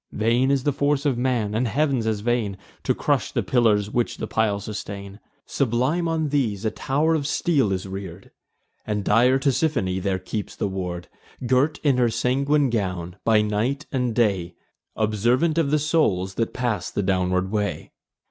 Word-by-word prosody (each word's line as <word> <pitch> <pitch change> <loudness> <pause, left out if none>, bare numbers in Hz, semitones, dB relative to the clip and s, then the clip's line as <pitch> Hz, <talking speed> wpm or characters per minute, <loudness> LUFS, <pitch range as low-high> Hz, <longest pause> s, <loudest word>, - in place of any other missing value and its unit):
Vain 120 +5 +2
is 140 -2 +1
the 145 - +1
force 145 +1 0
of 140 -3 +2
man, 120 -4 0
and 120 +3 +1
Heav'n's 135 -2 0
as 110 -2 -1
vain, 115 -4 -1 0.3
To - - +2
crush - - 0
the - - -1
pillars 105 -4 +2
which 120 -1 -1
the - - -3
pile 110 -2 0
sustain. 100 -1 -7 0.3
Sublime 135 +7 0
on 160 -2 0
these 115 -8 0
a 110 - +1
tow'r 150 +5 0
of 145 -3 0
steel 145 - +1
is 95 0 -2
rear'd; 95 -3 -8 0.5
And 105 -1 -2
dire 120 +6 +4
Tisiphone 130 - 0
there 95 0 0
keeps 100 +3 -5
the - - -1
ward, 90 -2 -4 0.4
Girt 130 +5 +2
in 140 -4 +3
her 120 -2 +3
sanguine 140 +3 +1
gown, 90 -5 -2
by 110 -2 +4
night 115 +8 -1
and 125 -4 -1
day, 95 -7 +1 0.4
Observant 120 +10 +1
of 150 -4 +1
the 150 - +3
souls 140 - +1
that 115 +3 -1
pass 120 -7 -2
the 100 - -2
downward 90 0 0
way. 105 -1 -2
115 Hz, 170 wpm, -23 LUFS, 100-135 Hz, 0.5 s, dire